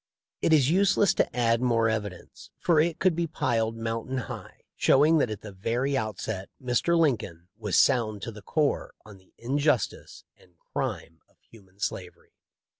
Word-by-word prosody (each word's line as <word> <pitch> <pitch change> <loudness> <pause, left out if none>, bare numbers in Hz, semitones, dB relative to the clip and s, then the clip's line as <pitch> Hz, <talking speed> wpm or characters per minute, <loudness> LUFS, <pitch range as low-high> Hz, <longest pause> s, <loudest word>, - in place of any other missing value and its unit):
It - - +2
is 150 -2 +4
useless 200 +1 +3
to - - 0
add 115 -1 +2
more 115 -2 +2
evidence 100 -4 -5
— - - -52
for 165 -3 +4
it 160 +1 +1
could 185 -3 +2
be 170 0 -1
piled 115 -6 -1
mountain 115 +3 -3
high 125 - -7
— - - -62
showing 155 +4 +4
that 125 - +1
at 105 -2 -6
the 105 - -9
very 120 +8 -1
outset 110 -4 -3
Mr. 130 +6 +1
Lincoln 100 - 0
was 105 -3 -1
sound 110 -5 +2
to 115 - -4
the 105 -1 -11
core 150 - -1
on 105 -2 -13
the 95 - -27
injustice 140 0 -1
and 90 -1 -25
crime 80 0 -5
of - - -32
human 95 -4 -20
slavery. 90 -3 -5
115 Hz, 175 wpm, -27 LUFS, 105-145 Hz, -, is